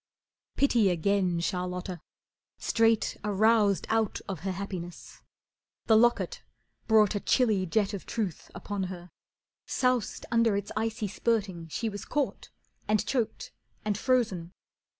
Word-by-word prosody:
Pity 235 -7 +4
again 180 0 +1
Charlotta, 180 0 -3 0.6
straight 225 -1 +2
aroused 210 -2 +3
Out 220 -2 +1
of 190 -5 -4
her 190 +4 -3
happiness. 180 -2 -7 0.6
The 220 - +5
locket 240 - +3 0.5
brought 215 -3 +5
A 205 - -1
chilly 210 -5 +2
jet 205 +3 +1
of 200 - -6
truth 205 -8 -3
upon 195 +2 -3
her, 180 -1 -8 0.6
soused 250 -4 0
Under 230 -3 +3
its 200 0 -4
icy 220 -1 -1
spurting 195 -5 -1
she 225 +8 -3
was 205 -2 -5
caught, 290 -2 -2 0.4
And 215 0 +2
choked, 235 -1 -2 0.3
and 210 -1 +1
frozen. 205 -8 0
205 Hz, 125 wpm, -29 LUFS, 185-225 Hz, 0.6 s, The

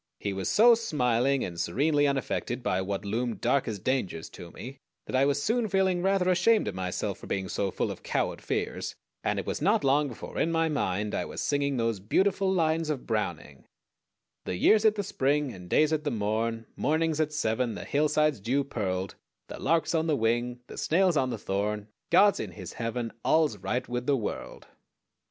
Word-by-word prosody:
He 100 - -2
was 95 -1 -2
so 235 +3 +7
smiling 135 - +1
and 85 -2 -7
serenely 145 - +2
unaffected 130 -2 -2
by 95 -5 0
what 100 +1 -3
loomed 115 +3 -2
dark 130 +3 +1
as 110 - -2
dangers 100 -7 -2
to 85 - -10
me 130 +9 -9 0.3
that - - -4
I 135 +1 +4
was 145 0 +1
soon 230 0 +1
feeling 190 -2 +1
rather 190 -1 +2
ashamed 185 +5 +3
of - - -2
myself 90 -1 -3
for - - -11
being 95 -1 -2
so 100 +1 -1
full - - -2
of - - -8
coward - - -1
fears, - - -3 0.3
and - - 0
it - - -3
was - - -3
not - - +3
long 140 +2 +3
before 120 - -7
in 165 - +1
my 165 0 +2
mind 105 -8 -1
I - - -1
was - - -7
singing 140 -1 0
those 115 -3 0
beautiful 190 - +1
lines 165 -3 +1
of 145 -5 -3
Browning: 85 - -3 0.8
The - - -2
year's 215 - +4
at 215 -1 +5
the 205 - -2
spring, 145 -4 0
And 90 -2 -11
day's 155 +1 +3
at 155 -1 0
the 150 - 0
morn; 115 +1 -1
Morning's 160 +1 0
at 155 -1 +1
seven; 120 -5 -1
The - - -7
hillside's 150 -2 +2
dew 130 +8 0
pearled; 95 -7 -3 0.4
The - - -7
lark's 165 +4 +1
on 160 0 +1
the 150 -3 +2
wing; 120 +2 0
The - - -9
snail's 180 +1 +2
on 130 -3 +2
the 120 - -3
thorn; 105 +1 -2 0.2
God's 200 +4 +5
in - - -5
his - - -8
heaven 115 0 -3
All's 155 -9 +3
right 120 +7 -2
with 125 0 -3
the 140 -2 +3
world! 110 - -5
130 Hz, 200 wpm, -28 LUFS, 105-155 Hz, 0.8 s, so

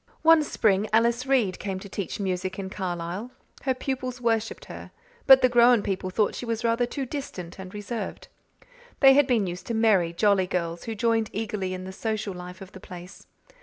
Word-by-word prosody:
One 325 0 +7
spring 210 -7 +1
Alice 235 +3 +2
Reade 240 -9 +2
came 195 -1 -3
to 200 - -10
teach 200 0 -5
music 185 -1 -2
in 190 -1 -5
Carlisle. 180 +3 -4 0.4
Her 260 -1 +1
pupils 255 -1 -4
worshipped 225 -2 -1
her, - - -9 0.4
but 265 -1 +8
the - - +7
grown 240 -2 +5
people 185 -1 -2
thought 205 +3 +1
she - - -6
was 230 0 -2
rather 235 +1 +1
too 270 +2 -4
distant 195 - -7
and 185 -1 -8
reserved. 210 +3 -6 0.7
They 270 -1 +8
had 285 0 +4
been 235 -6 +2
used 180 0 -6
to 235 - -2
merry, 210 -7 +3
jolly 190 +1 +2
girls 170 -2 -3
who 225 - -4
joined 225 0 +1
eagerly 200 -3 -3
in 185 - -7
the 190 0 -7
social 215 -1 -3
life 180 +1 -9
of 190 0 -10
the 190 - -11
place. 180 +1 -11
210 Hz, 195 wpm, -26 LUFS, 185-235 Hz, 0.7 s, but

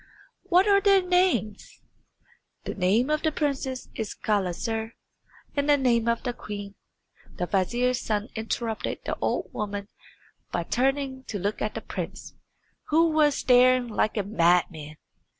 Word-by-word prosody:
"What 365 +4 +3
are 400 -1 +5
their 395 -1 +5
names?" 360 - 0 0.8
"The - - -4
name 210 +9 +2
of 305 0 +1
the 315 - +1
princess 275 -4 -2
is 220 -3 -5
Gulizar, 220 +3 -2 0.6
and 285 0 0
the 290 - +6
name 235 -4 +2
of 235 0 0
the 245 - -2
queen 205 -3 -7 0.3
" - - -26
The 180 - -1
vizier's 240 +7 0
son 215 +1 -2
interrupted 225 0 -3
the - - -2
old - - -1
woman 205 -1 -4 0.6
by - - -1
turning 265 +1 -1
to 205 - -4
look 200 +3 -3
at 215 - -2
the - - -4
prince, - - -6 0.5
who 325 +1 +3
was 300 -2 +3
staring 250 -1 +4
like 215 0 0
a 205 - +1
madman. 170 -5 +1
235 Hz, 150 wpm, -26 LUFS, 205-280 Hz, 0.8 s, the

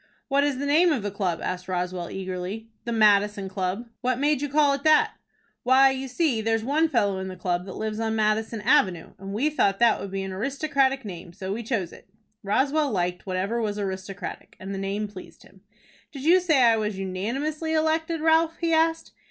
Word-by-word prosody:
"What 280 0 +3
is 285 -2 0
the 280 - -3
name 325 +5 +4
of 260 -9 -1
the 205 - -2
club?" 190 -4 -2
asked 185 0 -4
Roswell, 180 -1 -3
eagerly. 190 +4 -5
"The 235 - -3
Madison 210 -2 +3
Club." 190 +4 -3
"What 255 -1 0
made 290 0 +1
you 290 - -2
call 290 0 +3
it 275 - -3
that?" 310 0 +4 0.5
"Why, 265 +2 +5
you 265 0 -4
see, 260 -4 0
there's 225 0 0
one 305 +6 +2
fellow 205 -8 +1
in 190 - -4
the 185 - -6
club 180 0 -2
that 190 - -7
lives 215 0 -3
on 220 -1 -1
Madison 220 +1 0
Avenue, 190 - +2
and 195 +1 -7
we 260 +10 0
thought 200 -9 +2
that 235 0 +4
would 200 - -5
be 195 0 -3
an 190 - -5
aristocratic 270 +3 0
name, 175 -3 -8
so 190 +2 -5
we 230 - -4
chose 220 -7 -2
it." - - -16 0.3
Roswell 275 +9 +1
liked 180 -3 -2
whatever 195 +5 -1
was 210 -2 -2
aristocratic, 190 -1 -6
and 195 +1 -6
the 195 - -4
name 200 +2 -2
pleased 195 -2 -12
him. - - -20 0.5
"Did 275 -3 -8
you 345 +5 +6
say 315 -8 +3
I 230 -1 +5
was 210 -2 -2
unanimously 265 - -3
elected, 320 +1 0
Ralph?" 325 +1 +3
he 335 -1 0
asked. 325 0 +1
220 Hz, 205 wpm, -25 LUFS, 195-285 Hz, 0.5 s, you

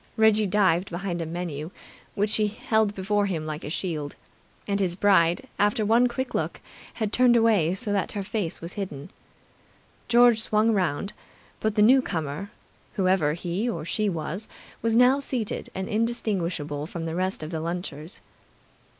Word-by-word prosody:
Reggie 220 -1 +4
dived 185 -2 +2
behind 175 -1 -3
a 165 - -3
menu, 165 -2 -4 0.5
which 205 +1 +1
he 215 -1 +2
held 215 0 0
before 205 +1 0
him 165 -5 -3
like 155 0 -5
a - - -5
shield, 155 -4 -3 0.5
and 200 -1 0
his 180 -3 0
bride, 180 -3 +3
after 210 +1 +2
one 230 +4 +4
quick 260 +2 -4
look, - - -2 0.4
had 215 -2 -2
turned 250 -1 +5
away 205 -7 +3
so 205 +1 -3
that 200 - -1
her 200 - -3
face 195 -4 -3
was 170 +2 -7
hidden. 155 -9 -6 1.0
George 240 -2 +5
swung 220 +1 +2
around, 195 0 0 0.5
but 215 -1 -1
the 210 - +5
newcomer, 200 - +2 0.4
whoever 185 -6 +2
he 175 +7 -2
or 165 -9 -4
she 205 +5 0
was, 170 +4 -4 0.3
was 225 0 +1
now 250 +3 +5
seated 250 -6 -3
and 190 0 -3
indistinguishable 180 -10 -1
from 165 -1 -5
the 165 - -3
rest 185 -1 -2
of 155 - -6
the 160 - -2
lunchers. 170 -1 -5
195 Hz, 160 wpm, -26 LUFS, 170-215 Hz, 1.0 s, turned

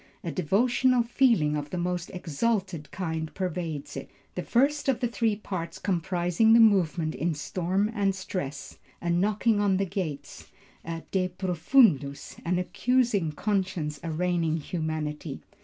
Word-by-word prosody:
A 170 - -3
devotional 240 - +2
feeling 230 - +3
of 145 0 -3
the 180 - -4
most 175 0 -2
exalted 180 -2 -2
kind 160 -4 -3
pervades 170 -5 -3
it. - - -6 0.2
The - - -3
first 280 +4 +2
of 255 -3 +2
the 245 - +1
three 230 -2 0
parts 180 -5 -5
comprising 180 +3 +2
the 230 - +7
movement 180 -7 +4
is 150 +3 -2
storm 190 +6 0
and 200 -3 +1
stress, 180 -7 -5 0.2
a 170 - -1
knocking 205 +4 +2
on 200 -2 +3
the 195 - +1
gates, 165 -7 -5 0.4
a 165 0 -5
De 185 -1 +1
Profundus, 175 - +2
an 175 +1 0
accusing 215 -2 +1
conscience 185 -6 -1
arraigning 165 0 0
humanity. 155 -2 -4
180 Hz, 140 wpm, -27 LUFS, 160-205 Hz, 0.4 s, the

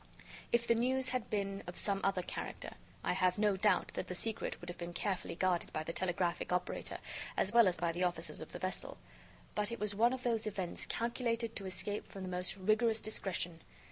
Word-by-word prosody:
If 235 0 +3
the - - +6
news 255 +3 +3
had 255 -3 -1
been 195 -1 -1
of 175 - -6
some 200 -1 +2
other 190 -2 +2
character, - - -5 0.3
I - - +2
have 185 -1 +3
no 205 -1 +4
doubt 190 0 +3
that 185 - -3
the 180 - -3
secret 220 +4 -2
would 175 - -10
have 175 0 -6
been 175 0 -4
carefully 190 -5 -1
guarded 180 -1 +1
by 155 - -1
the 165 - -4
telegraphic 175 -1 0
operator 180 0 -1 0.4
as 195 - +2
well 235 -3 +8
as 180 -1 +2
by 170 0 +1
the 175 +2 -1
officers 175 -1 0
of - - -7
the - - -5
vessel. - - 0 0.6
But 210 +1 +1
it 235 - -4
was 210 -1 +1
one 230 +4 +4
of 260 -1 -4
those 225 -2 +1
events 190 -4 -2
calculated 235 -1 -1
to 195 - -4
escape 205 +2 -2
from 195 - -6
the 185 - -4
most 180 +1 0
rigorous 220 +3 +3
discretion. 180 -6 -2
195 Hz, 210 wpm, -35 LUFS, 180-225 Hz, 0.6 s, well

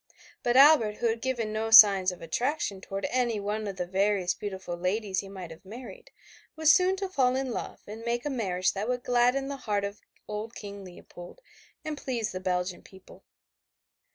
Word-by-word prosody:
But 240 +1 +1
Albert, 275 -6 +7
who 240 - -4
had 225 0 -2
given 235 -5 -2
no 220 +1 -2
signs 200 -4 +8
of 180 - -11
attraction 240 - -2
toward 195 +1 -5
any 240 -4 0
one 210 +1 -3
of 195 - -5
the 180 -1 -3
various 190 0 +1
beautiful 190 -3 -6
ladies 190 +2 -1
he 195 - -6
might 185 -4 -8
have 160 - -13
married, 225 - -11 0.5
was 315 0 +5
soon 370 0 +3
to 390 0 -3
fall 260 -8 +1
in 265 -1 -2
love - - -6
and 220 +2 -9
make 240 +2 -2
a 295 - -1
marriage 185 -7 0
that 205 +4 -3
would 250 0 -2
gladden 250 +2 +2
the 280 0 -5
heart 205 -5 -2
of 200 +1 -5 0.3
old 215 +2 -6
King 200 -1 -8
Leopold, 175 - -12 0.5
and 305 -2 -4
please 235 -5 -3
the 185 - -5
Belgian 180 -1 -2
people. 190 -1 -17
215 Hz, 190 wpm, -28 LUFS, 190-250 Hz, 0.5 s, signs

